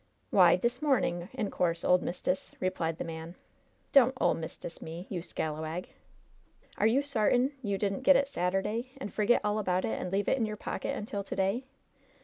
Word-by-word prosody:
"W'y, - - +6
dis 240 +1 -1
momin', 205 - +1
in 220 -6 -3
course, 170 -2 0
ole 180 - +5
mist'ess," 180 +1 -3
replied 165 -3 -1
the - - -3
man. 165 +1 -7 0.6
*T)on't 260 -2 +7
'ole - - +4
mist'ess' 165 +1 -7
me, 165 +3 -7
you 180 -3 -2
scalawag! 160 +1 -4 0.9
Are 215 - +5
you 260 +6 +3
sar 240 -7 +1
tain 250 +3 +3
you 200 -5 -1
didn't 200 +3 -1
get 275 +1 +6
it 275 +1 +3
Saturday, 210 +4 -1
and 265 -7 -6
forget 220 +3 +3
all 210 +1 +1
about 185 -3 0
it, - - -2
and 180 - -4
leave 200 +1 0
it - - +3
in 225 - +1
your 210 0 -5
pocket - - -3
until 205 -1 -4
to - - -5
day 195 +7 0
200 Hz, 190 wpm, -30 LUFS, 175-240 Hz, 0.9 s, T)on't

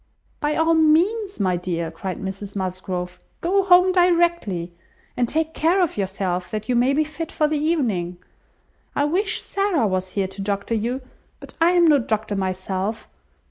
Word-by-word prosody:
"By 295 0 0
all 325 +1 +3
means, 350 - +2
my 185 -3 +1
dear," 170 -2 -3
cried 185 +2 -5
Mrs 195 +1 -6
Musgrove, 185 -1 -4 0.2
"go 385 +4 +2
home 370 -1 +5
directly, 340 - +2 0.4
and 245 -2 0
take 320 0 -1
care 340 +5 +2
of 355 -4 +1
yourself, 190 -2 -2
that 215 0 -4
you 250 - +1
may 245 +3 +3
be 300 +3 +2
fit 310 +2 -6
for 305 - +1
the 300 0 -1
evening. 225 - 0 0.8
I 285 - +2
wish 380 +7 0
Sarah 390 - 0
was 185 -2 -1
here 195 -2 0
to 195 +1 -8
doctor 200 +2 -2
you, 240 +4 -2 0.4
but - - -12
I 340 +2 +5
am 350 -1 +5
no 300 -3 +5
doctor 215 -3 -2
myself. 190 +2 -3
235 Hz, 170 wpm, -22 LUFS, -, 0.8 s, home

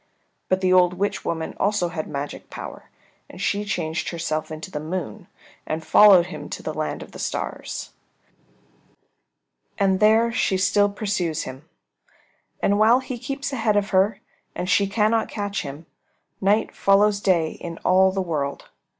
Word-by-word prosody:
But 185 0 +1
the 185 -1 +3
old 180 -1 +4
witch 200 +3 -2
woman 160 -1 -3
also 200 -3 +1
had 160 -2 -5
magic 140 0 -6
power, - - -9 0.4
and - - -12
she 205 +1 0
changed 165 -6 -2
herself 155 -2 -3
into 155 +4 -7
the 150 - -3
Moon 155 - -5 0.4
and 160 +1 -3
followed 195 -5 +7
him 180 - -8
to - - -6
the - - -3
land - - -3
of - - -15
the - - -11
stars. - - -4 1.9
And 190 -2 +2
there 220 +2 +4
she 195 -4 +1
still 205 +2 +3
pursues 195 -6 -2
him. 135 +5 -10 0.9
And 205 +1 +3
while 225 +4 +6
he 255 -2 -6
keeps 275 +3 -4
ahead 225 -4 +1
of 205 0 0
her 195 +2 +2 0.4
and 180 - -3
she 200 +1 +3
cannot 215 +2 +1
catch 205 -2 -3
him, 145 +3 -8 0.6
night 205 +3 +1
follows 200 +1 +3
day 170 -6 +2
in 170 -1 -8
all 190 +1 +5
the 190 0 -1
world. 145 -5 -3
190 Hz, 160 wpm, -23 LUFS, 165-205 Hz, 1.9 s, followed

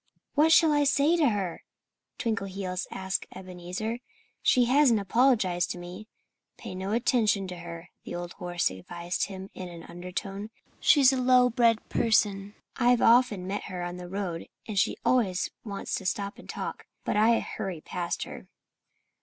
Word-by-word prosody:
"What 310 +2 +4
shall 325 -1 +6
I 290 0 +3
say 285 +3 +3
to 300 -5 +4
her?" 195 -5 -3 0.5
Twinkleheels 195 -4 -3
asked 190 0 -3
Ebenezer. 185 +5 -5 0.4
"She 250 -1 +4
hasn't 255 -3 +4
apologized 200 -4 +2
to - - -4
me." 180 +4 -9 0.5
"Pay - - -8
no 190 +2 -4
attention 220 -4 +2
to 180 - -6
her," 170 0 -9
the - - -6
old 175 0 -5
horse 175 - -1
advised 170 - -3
him 190 -1 -8
in 185 -1 -7
an 170 -1 -10
undertone. 195 +4 -6 0.3
"She's 275 -3 +6
a 260 - 0
low 250 0 +5
bred 230 -1 +2
person. 205 -3 +1 0.2
I've 245 -1 +4
often 230 -5 +4
met 200 +2 -3
her 180 -2 -5
on 175 0 -5
the 180 0 -8
road 185 -4 -4 0.2
and 210 -3 0
she 210 - +1
always 205 -8 +2
wants 200 -3 -5
to 190 - -4
stop 200 +1 -3
and - - -14
talk. - - -5 0.2
But - - 0
I 225 +2 +4
hurry 190 -5 -5
past 175 +2 -3
her." - - -9
200 Hz, 160 wpm, -28 LUFS, 180-235 Hz, 0.5 s, shall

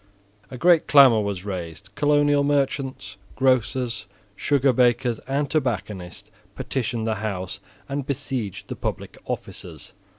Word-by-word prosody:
A 130 - -8
great 170 +4 +4
clamour 135 -6 +7
was 100 -2 -3
raised 95 +1 -6
Colonial 145 -1 +3
merchants, 135 -6 -1 0.2
grocers, 125 -3 +1 0.3
sugar 135 +5 +2
bakers 120 -1 +2
and 140 +2 0
tobacconists, 105 - -3 0.2
petitioned 120 -3 -2
the 110 -1 0
House 95 -4 -4 0.3
and 140 +1 -3
besieged 130 - -4
the - - -5
public - - -5
offices. - - -7
125 Hz, 120 wpm, -24 LUFS, 105-140 Hz, 0.3 s, clamour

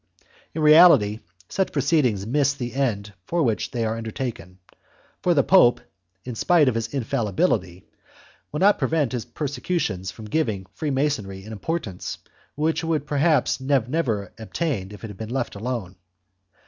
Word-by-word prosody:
In 160 - -1
reality 150 -10 +7 0.3
such 190 - -1
proceedings 135 - +1
miss 140 +4 +1
the 120 -3 -5
end 105 -7 -1
for 170 -1 +1
which 115 -5 0
they 120 -3 -2
are 110 0 -1
undertaken, 110 -5 -5 0.7
and 175 -1 +3
the 140 - +5
Pope, 180 -11 +5 0.5
in 125 - -5
spite 155 +6 +3
of 130 - +3
his 115 0 -2
infallibility, 110 - -1 0.7
will 150 - -3
not 205 +2 +5
prevent 145 -1 +1
his 120 -3 -3
persecutions 145 - -3
from 110 +4 -9
giving 105 -6 -1
Freemasonry 135 -10 -2
an 110 - -10
importance 110 - -4 0.4
which 155 +3 0
it 165 - -4
would 155 -3 0
perhaps 150 -2 +2
have 130 -4 +2
never 115 -10 -1
obtained 110 - -3
if 105 - -12
it - - -4
had 100 - -12
been 110 +1 -6
left 135 +2 -2
alone. 105 -3 -4
125 Hz, 155 wpm, -24 LUFS, 105-150 Hz, 0.7 s, reality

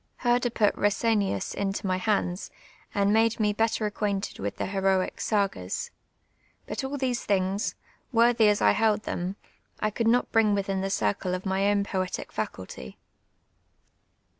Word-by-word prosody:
Herder 245 0 +2
put 215 -3 +1
llesenius 205 - +1
into 200 0 -2
my 185 -1 +1
hands, 185 -2 -1 0.4
and 200 0 +2
nuule 225 +1 +5
me 210 -1 +2
better 225 +1 +1
acquainteil 205 -1 -2
with 100 +1 -3
the - - -2
luToic 190 -1 0
sn(/(is. 195 - -1 0.8
Hut - - -4
all 270 +2 -3
these 255 -3 -1
things, 195 +1 0 0.4
worthy 235 -2 +5
as 205 - +1
I - - +6
held 215 -1 +2
them, 180 +2 -3 0.4
1 215 - -1
coidd 230 +2 -1
not 245 +2 +2
bring 215 -2 +4
Mithin 195 -1 -1
the 195 - -1
circle 180 - 0
of 185 - -6
my 195 +1 +1
own 205 -1 +2
poetic 185 -2 -3
faculty. 95 -11 -6
205 Hz, 150 wpm, -27 LUFS, 190-225 Hz, 0.8 s, I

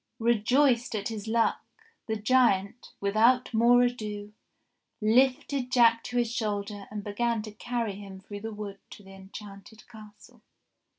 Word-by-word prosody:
Rejoiced 235 +2 +2
at 205 0 -2
his 220 -2 -6
luck 230 +1 +1 0.5
the 220 - -1
giant, 220 -2 +1
without 230 +6 +2
more 240 +2 +5
ado, 210 -4 -3 0.7
lifted 255 +3 +2
Jack 230 -2 +4
to 245 - -4
his 240 -2 +1
shoulder 205 -3 -3
and 210 -1 -6
began 225 +2 -1
to 215 - -8
carry 230 0 -3
him 195 -2 -10
through 205 +1 -9
the 225 +1 -5
wood 205 -2 -7
to 205 - -12
the 195 0 -14
enchanted 195 +2 -12
castle. 215 -3 -15
220 Hz, 140 wpm, -28 LUFS, 205-240 Hz, 0.7 s, more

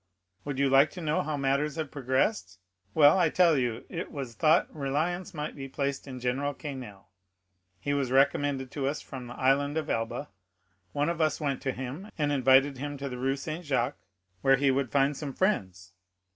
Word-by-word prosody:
Would 140 -2 -3
you 140 0 +3
like 135 +2 +5
to 185 - -8
know 155 -1 +1
how 150 0 -3
matters 140 +2 0
have 155 -4 -4
progressed? 135 - 0 0.4
Well, 155 +3 +7
I 175 - +5
will 160 - 0
tell 175 -3 +5
you. 120 -3 -1
It 170 0 -5
was 135 -6 -5
thought 155 +9 +3
reliance 160 +7 -1
might 150 -4 -5
be 135 -1 -7
placed 140 0 -3
in 130 -2 -7
General 135 +3 -1
Quesnel; 125 -10 -8 0.7
he 145 - -1
was 140 -3 0
recommended 135 0 +2
to 140 -2 -2
us 145 +2 -1
from 130 -2 -8
the 120 - -8
Island 140 +3 +2
of 155 -1 -2
Elba; 115 +5 -2 0.6
one 145 - 0
of 170 -1 -2
us 155 -1 +1
went 140 -4 -2
to 135 - -1
him, 135 - -6
and 145 -2 +1
invited 135 0 +4
him 145 +1 -4
to 140 0 -4
the 125 -1 -6
Rue 135 +1 +1
Saint 155 +5 -5
Jacques, 135 -3 -1 0.4
where 135 0 +5
he 135 0 +3
would 130 -2 -1
find 140 +1 +2
some 140 -1 -5
friends. 95 - -1
140 Hz, 200 wpm, -28 LUFS, 130-150 Hz, 0.7 s, Well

